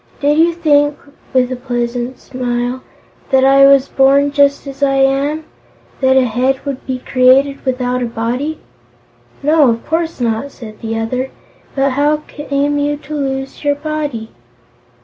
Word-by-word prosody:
Did 295 Hz, +2 st, +2 dB
you 335 Hz, +1 st, +5 dB
think," 290 Hz, -3 st, +2 dB, 0.4 s
with 255 Hz, -1 st, +2 dB
a -, -, -1 dB
pleasant 245 Hz, 0 st, -3 dB
smile, 245 Hz, 0 st, -3 dB, 0.5 s
"that 265 Hz, -1 st, +4 dB
I 275 Hz, 0 st, +6 dB
was 275 Hz, -1 st, +5 dB
born 275 Hz, +1 st, +3 dB
just 280 Hz, 0 st, +2 dB
as 275 Hz, 0 st, -9 dB
I 275 Hz, -1 st, +2 dB
am? 275 Hz, +3 st, +1 dB, 0.6 s
That 265 Hz, -1 st, +3 dB
a 260 Hz, -, +4 dB
Head 255 Hz, +4 st, 0 dB
would 275 Hz, -2 st, -5 dB
be 260 Hz, -1 st, -2 dB
created 260 Hz, +2 st, +3 dB
without 250 Hz, -1 st, -1 dB
a 245 Hz, -, -1 dB
Body?" 245 Hz, +7 st, -3 dB, 0.9 s
"No, 300 Hz, -2 st, +4 dB
of 230 Hz, 0 st, -2 dB
course 325 Hz, -1 st, -2 dB
not," 235 Hz, +3 st, -1 dB
said 215 Hz, -5 st, -11 dB
the 225 Hz, 0 st, -3 dB
other. 255 Hz, +4 st, -2 dB, 0.5 s
"But 275 Hz, 0 st, +1 dB
how 295 Hz, +3 st, +1 dB
came 290 Hz, 0 st, -1 dB
you 290 Hz, 0 st, 0 dB
to 300 Hz, +1 st, -10 dB
lose 270 Hz, -2 st, -4 dB
your 290 Hz, 0 st, +2 dB
body?" 290 Hz, -7 st, -4 dB
270 Hz, 155 wpm, -16 LUFS, 250-290 Hz, 0.9 s, I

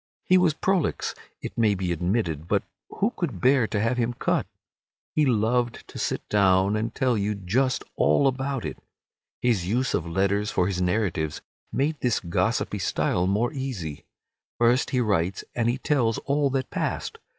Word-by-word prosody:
He 185 Hz, -, +4 dB
was 170 Hz, -4 st, +3 dB
prolix, 190 Hz, -1 st, 0 dB, 0.3 s
it -, -, -5 dB
may 105 Hz, -3 st, +4 dB
be 90 Hz, -2 st, -2 dB
admitted, 85 Hz, -2 st, -1 dB
but -, -, +1 dB, 0.3 s
who 210 Hz, +4 st, 0 dB
could 140 Hz, -, -3 dB
bear 130 Hz, +3 st, +4 dB
to 105 Hz, -, -1 dB
have 115 Hz, +4 st, +1 dB
him 120 Hz, 0 st, 0 dB
cut? -, -, 0 dB, 0.7 s
He 150 Hz, -2 st, +3 dB
loved 120 Hz, +1 st, +1 dB
to -, -, -8 dB
sit -, -, -2 dB
down 95 Hz, 0 st, +3 dB
and 110 Hz, +2 st, -2 dB
tell 130 Hz, -2 st, +2 dB
you 105 Hz, 0 st, 0 dB
just 120 Hz, +8 st, 0 dB
all 140 Hz, -, +4 dB
about 135 Hz, -, -1 dB
it. 75 Hz, -, -5 dB, 0.6 s
His 110 Hz, -8 st, +2 dB
use 125 Hz, +6 st, 0 dB
of 85 Hz, -, -1 dB
letters 100 Hz, +4 st, +1 dB
for 90 Hz, -, +1 dB
his 90 Hz, -1 st, -1 dB
narratives 90 Hz, -5 st, -1 dB, 0.3 s
made 150 Hz, +3 st, 0 dB
this 120 Hz, -3 st, +1 dB
gossipy 85 Hz, -2 st, -1 dB
style 90 Hz, +1 st, 0 dB
more 110 Hz, +8 st, +1 dB
easy. 115 Hz, -, -5 dB, 0.5 s
First 120 Hz, +2 st, +3 dB
he 125 Hz, -, +1 dB
writes 95 Hz, -4 st, 0 dB
and 120 Hz, -1 st, +1 dB
he 120 Hz, -, 0 dB
tells 130 Hz, -6 st, +1 dB
all 140 Hz, 0 st, +2 dB
that 135 Hz, -1 st, -2 dB
passed. -, -, -3 dB
115 Hz, 170 wpm, -25 LUFS, 95-130 Hz, 0.7 s, He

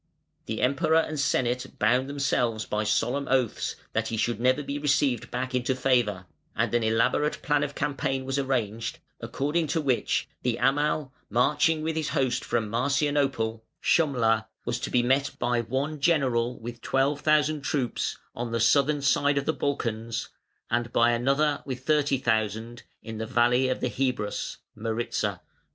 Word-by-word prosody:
The 110 Hz, 0 st, -3 dB
Emperor 140 Hz, +5 st, +2 dB
and 155 Hz, -2 st, 0 dB
Senate 125 Hz, -2 st, 0 dB
bound 125 Hz, +5 st, +2 dB
themselves 125 Hz, -6 st, 0 dB
by 105 Hz, 0 st, -1 dB
solemn 130 Hz, +6 st, 0 dB
oaths 130 Hz, -4 st, 0 dB, 0.2 s
that 115 Hz, 0 st, 0 dB
he 115 Hz, -, -3 dB
should 115 Hz, +1 st, 0 dB
never 130 Hz, +4 st, +2 dB
be 140 Hz, +1 st, -4 dB
received 140 Hz, -4 st, +1 dB
back 130 Hz, +1 st, -3 dB
into 125 Hz, +1 st, 0 dB
favour, 120 Hz, -8 st, +1 dB, 0.3 s
and -, -, 0 dB
an 120 Hz, -, +3 dB
elaborate 115 Hz, +7 st, +1 dB
plan 145 Hz, -1 st, +2 dB
of 145 Hz, -, -4 dB
campaign 135 Hz, -2 st, -1 dB
was 135 Hz, +1 st, -1 dB
arranged, 115 Hz, -4 st, -2 dB, 0.2 s
according 150 Hz, +4 st, -1 dB
to 160 Hz, +3 st, 0 dB
which 135 Hz, -5 st, 0 dB
the 120 Hz, -2 st, 0 dB
Amal 145 Hz, +1 st, +1 dB, 0.2 s
marching 150 Hz, +7 st, +2 dB
with 160 Hz, 0 st, -1 dB
his 155 Hz, -2 st, -1 dB
host 135 Hz, -4 st, 0 dB
from 115 Hz, -2 st, -1 dB
Marcianople, 135 Hz, -2 st, 0 dB, 0.2 s
(Shumla) 115 Hz, -8 st, +2 dB, 0.2 s
was 120 Hz, +1 st, -1 dB
to -, -, -4 dB
be 120 Hz, -, +2 dB
met 135 Hz, +3 st, +1 dB
by 120 Hz, 0 st, +1 dB
one 135 Hz, +6 st, -2 dB
general 130 Hz, -6 st, +1 dB
with 120 Hz, +1 st, -8 dB
twelve 140 Hz, +2 st, +1 dB
thousand 155 Hz, 0 st, +2 dB
troops, 135 Hz, -3 st, -1 dB, 0.2 s
on 120 Hz, 0 st, -4 dB
the 115 Hz, -, 0 dB
southern 140 Hz, +5 st, +3 dB
side 145 Hz, 0 st, +3 dB
of 140 Hz, -, 0 dB
the 160 Hz, -, +1 dB
Balkans, 115 Hz, -6 st, -2 dB, 0.4 s
and 120 Hz, 0 st, 0 dB
by 120 Hz, 0 st, +4 dB
another 140 Hz, +5 st, +1 dB
with 130 Hz, -1 st, -6 dB
thirty 150 Hz, -3 st, +2 dB
thousand 110 Hz, 0 st, -1 dB, 0.2 s
in 110 Hz, -1 st, -7 dB
the 110 Hz, -, -3 dB
valley 125 Hz, +2 st, +3 dB
of 130 Hz, -, -2 dB
the -, -, +1 dB
Hebrus 125 Hz, -3 st, -2 dB, 0.2 s
(Maritza). 115 Hz, +1 st, -2 dB
130 Hz, 160 wpm, -27 LUFS, 115-140 Hz, 0.4 s, by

